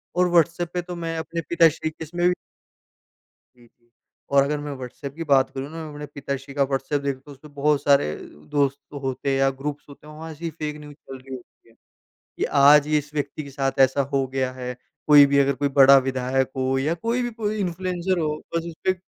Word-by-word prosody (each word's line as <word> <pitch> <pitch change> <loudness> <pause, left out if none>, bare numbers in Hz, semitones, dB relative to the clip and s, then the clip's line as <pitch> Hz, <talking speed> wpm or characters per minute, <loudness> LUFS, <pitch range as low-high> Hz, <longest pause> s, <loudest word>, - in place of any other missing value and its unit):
और 180 0 +3
व्हाट्सएप 170 0 +2
पे 180 - -1
तो 175 0 -7
मैं 165 -1 -4
अपने 165 +1 -4
पिताश्री 165 -2 +3
केस 155 0 -10
में 175 0 +3
भी 180 - +4 1.2
जी, 120 -1 -20
जी। 120 0 -37 0.4
और 140 -1 +5
अगर 150 +1 -1
मैं 145 0 -5
व्हाट्सएप 130 +2 -8
की 165 - -4
बात 135 -3 +3
करूँ 135 +1 -6
ना, 160 -1 -7
अपने 150 0 -7
पिताश्री 140 -1 -6
का 140 -1 +2
व्हाट्सएप 135 +1 -1
देखूँ 140 -2 -3
तो 145 - -12
उसपे 140 +2 -13
बहुत 145 0 0
सारे 140 - +4
अ, - - -10 0.3
दोस्त 140 -1 +1 0.2
होते 135 +1 -1
या 135 0 +3
ग्रुप्स 145 0 -4
होते 145 +1 -14
हैं 150 - -11
वहाँ 160 +1 -8
ऐसी 165 +2 -5
फेक 155 -1 -5
न्यूज 150 -1 -11
चल 135 -3 -11
रही 130 0 -9
होती 120 -1 -16
है - - -22 0.7
कि - - 0 0.2
आज 145 +1 +7
ये 155 -1 +3
इस 150 0 -8
व्यक्ति 145 +1 -3
के 140 - -10
साथ 135 -1 -2
ऐसा 135 +2 -3
हो 135 -1 +1
गया 130 -1 0
है, 125 -1 -6 0.3
कोई 145 -1 +8
भी 140 0 +2
अगर 140 0 +4
कोई 140 - +3
बड़ा 135 +1 +9
विधायक 130 0 -1
हो 130 0 0
या 155 +5 0
कोई 230 +7 -1
भी 240 - -2
कोई 215 -2 -3
इन्फ्लुएंसर 185 0 -1
हो 155 -2 -1 0.2
बस 165 - -1
उसपे 180 +2 -2
145 Hz, 220 wpm, -23 LUFS, 135-165 Hz, 1.2 s, बड़ा